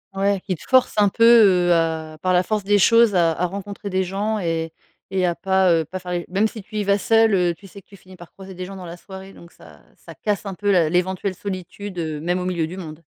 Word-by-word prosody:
Ouais, 195 0 0
qui 190 - -1
te - - -17
forcent 260 -1 +4
un 205 - +4
peu, 230 - 0 0.5
heu, - - +6
à 160 -1 -1
par 185 0 +1
la 180 - +3
force 215 +2 -2
des 205 +1 +3
choses, 230 +1 +4
à 170 -2 +3
à 180 +3 -1
rencontrer 200 +2 -7
des 190 0 0
gens 205 +4 -2
et 165 -3 -2 0.4
et 190 -1 0
à 175 - +1
pas, 190 0 +2
heu, 165 -2 +2
pas 185 +5 -7
faire 180 -1 -8
les 175 -1 -3
même 200 +4 +1
si 220 -1 -9
tu 215 +3 -14
y 210 - 0
vas 200 0 +2
seul, 225 +1 +3
heu, 180 -2 +2
tu 200 - -18
sais 195 +1 -13
que - - -46
tu 200 - -15
finis 185 0 -16
par 175 -1 -14
croiser 190 0 -12
des 180 0 -7
gens 195 +1 -9
dans 185 -2 -9
la 170 +1 -8
soirée 190 +1 -11
donc 170 - -15
ça - - -17 0.2
ça - - -13
casse 210 0 -3
un 195 - -4
peu 205 +2 -1
la 170 -4 +3
l'éventuelle 185 +2 -1
solitude, 190 0 -7
heu, 155 -3 -3
même 175 +2 -1
au 180 - -4
milieu 170 -3 -1
du 180 +3 -9
monde. 165 -3 -9
185 Hz, 275 wpm, -21 LUFS, 175-200 Hz, 0.5 s, heu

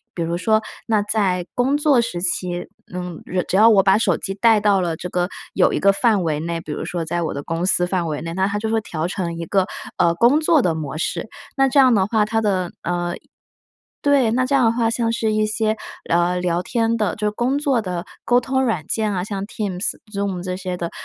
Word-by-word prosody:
比 170 - -3
如 170 +1 -1
说 215 +3 +2 0.2
那 215 -3 +2
在 195 -4 0
工 260 +3 +2
作 290 -4 +3
时 180 -7 -2
期， 175 -1 -2 0.3
嗯， 180 -2 -6 0.2
只 190 - +1
要 220 +2 +7
我 205 -4 +6
把 190 +1 +4
手 225 - +2
机 195 -1 -4
带 225 0 +4
到 205 -2 +3
了 170 -3 -1
这 180 - -6
个 180 0 0 0.3
有 - - +3
一 - - 0
个 200 - +5
范 210 -1 +2
围 155 -3 -1
内， 165 +1 -3
比 150 - -8
如 160 - -4
说 175 -1 -3
在 170 +1 -2
我 - - -2
的 140 - -4
公 165 +4 -3
司 180 -2 +2
范 180 -2 -1
围 155 -2 -3
内， 165 0 -5
那 190 0 +1
它 205 +1 -1
就 220 +1 -2
会 225 0 +2
调 165 -4 -3
成 175 -3 -3
一 - - -3
个， 190 +2 +1 0.3
呃， 170 0 +3
工 240 - +4
作 315 -2 +4
的 165 -6 +1
模 155 -1 -5
式。 215 - -2 0.3
那 270 0 +4
这 275 +2 +3
样 255 -4 +6
的 190 -2 +3
话， 215 0 +1
它 225 +1 0
的， 185 -4 0
呃 175 0 -2 0.9
对， 275 -6 +3
那 255 +1 +2
这 280 - -4
样 260 -3 +4
的 225 - +4
话， 230 -1 +1
像 230 -1 0
是 220 -2 0
一 215 0 +2
些 215 0 0 0.3
聊 175 +1 +1
聊 175 -1 0
天 230 +2 0
的 210 -5 0
就 210 0 -3
是 - - +2
工 245 +6 -1
作 275 -5 +1
的 180 -2 -4 0.2
沟 245 +1 +4
通 265 +1 0
软 220 -11 -1
件 215 -2 0
啊， 180 -2 -1
像 200 0 -4
Teams、 200 -3 -2 0.2
Zoom 200 -3 -2
这 185 0 -3
些 185 -1 -4
的 170 -1 -4
200 Hz, 275 characters per minute, -21 LUFS, 175-225 Hz, 0.9 s, 要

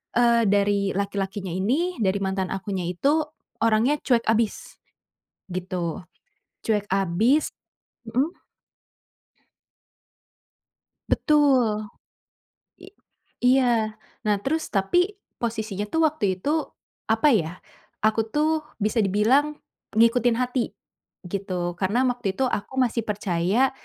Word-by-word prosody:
eee, 235 -1 +4
dari 200 0 +2
laki-lakinya 200 -1 -2
ini, 255 - 0
dari 200 -1 +1
mantan 190 -1 -1
akunya 190 -1 -3
itu, 285 - +1 0.4
orangnya 230 +6 +3
cuek 235 -3 +2
abis, 225 -1 0 0.8
gitu. 180 -2 -3 0.6
Cuek 210 -2 +1
abis 195 - +2 0.6
mhm. 265 +8 +1 2.8
Betul. 255 -8 +3 0.9
I 380 - -12 0.5
iya, 240 -4 +3 0.3
nah, 210 - +4
terus 315 +4 -1
tapi 355 - +2 0.2
posisinya 220 -3 -3
tuh 325 - +2
waktu 305 -8 -2
itu, 280 - -2 0.6
apa 225 +6 +3
ya. 165 -8 +2 0.5
Aku 220 +1 +3
tuh, 305 +5 +1 0.2
bisa 215 +2 +1
dibilang 250 +10 +3 0.4
ngikutin 230 +1 +4
hati, 250 -1 -1 0.5
gitu. 180 -2 -3
Karena, 205 +7 +1
waktu 240 -6 -3
itu 265 - 0
aku 210 +1 -3
masih 230 -1 -1
percaya. 200 +4 +1
220 Hz, 100 wpm, -24 LUFS, 195-255 Hz, 2.8 s, eee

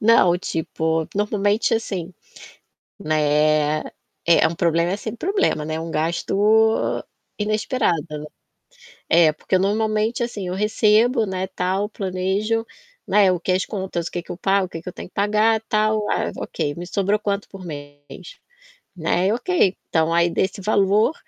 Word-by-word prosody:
Não, 210 -6 +5
tipo, 160 -2 -2
normalmente 205 +1 +1
assim, 190 -6 -3 0.9
né, 155 0 +2 0.5
é, 170 - +5
um 165 - -5
problema 170 +2 +1
sem 220 +2 -6
problema, 370 - 0
né, 155 +1 -3
um 165 - -5
gasto 205 +8 +2 0.4
inesperado, 215 0 0 0.2
né. 150 0 -6 0.9
É, 165 -2 +6
porque 170 +4 0
normalmente 215 +4 0
assim 210 -6 -4
eu 180 - -3
recebo, 215 +3 +3
né, 190 -1 -3
tal, 190 +2 -1
planejo, 200 +3 -1 0.4
né, 195 -1 +4
o 180 - -1
que 180 - -2
é - - +3
as 185 - 0
contas, 190 -5 -4
o - - -8
que 175 - -3
que - - -9
eu - - -4
pago, 195 0 +2
o - - -24
que 165 - -7
que 175 - -7
eu - - -10
tenho - - -8
que - - -52
pagar, 215 +2 +2
tal, 215 0 +1
ah, - - 0
ok, 145 -3 -3
me 175 - -6
sobrou 200 +3 +1
quanto 200 -1 -2
por 190 -2 -10
mês? 145 - -10 0.6
Né, 180 +3 +1
ok. 245 - +1
Então 160 0 +1
aí 170 0 +3
desse 190 +3 -1
valor, 205 - +3
190 Hz, 160 wpm, -22 LUFS, 170-215 Hz, 0.9 s, É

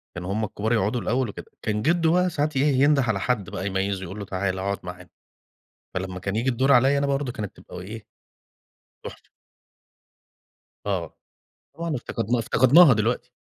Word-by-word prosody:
كانوا 90 +2 -5
هُم 110 +1 -1
الكبار 110 +3 -2
يقعُدوا 110 +2 +1
الأول 125 -1 0
وكده. - - -10
كان 105 -1 -1
جدو 165 +2 +2
بقى 180 0 +3
ساعات 150 -2 -1
إيه 135 - +3 0.2
ينُده 145 -1 +4
على 110 -5 0
حد 105 -3 -1
بقى 95 - -4
يميِّزه، 95 0 -1
يقول 95 +4 -7
له: 100 - -5
"تعالَ، 95 0 -2
اقعد 100 +1 -2
معانا." 90 0 -9 0.9
فلما 95 0 -4
كان 100 +3 -3
ييجِي 125 +4 +1
الدَور 130 +3 +2
عليّا 135 +3 +5
أنا 140 - 0
برضه 140 -2 -1
كانت 105 -3 -6
تبقى - - -10
إيه، 105 +4 -9 1.0
تُحفة. - - -9 1.6
آه، 90 -5 -3 0.6
طبعًا 165 -2 -3
افتقَدنا 115 0 -2
افتقَدناها 130 +6 +6
دلوقتي. 115 +3 -1
110 Hz, 165 wpm, -24 LUFS, 100-135 Hz, 1.6 s, افتقَدناها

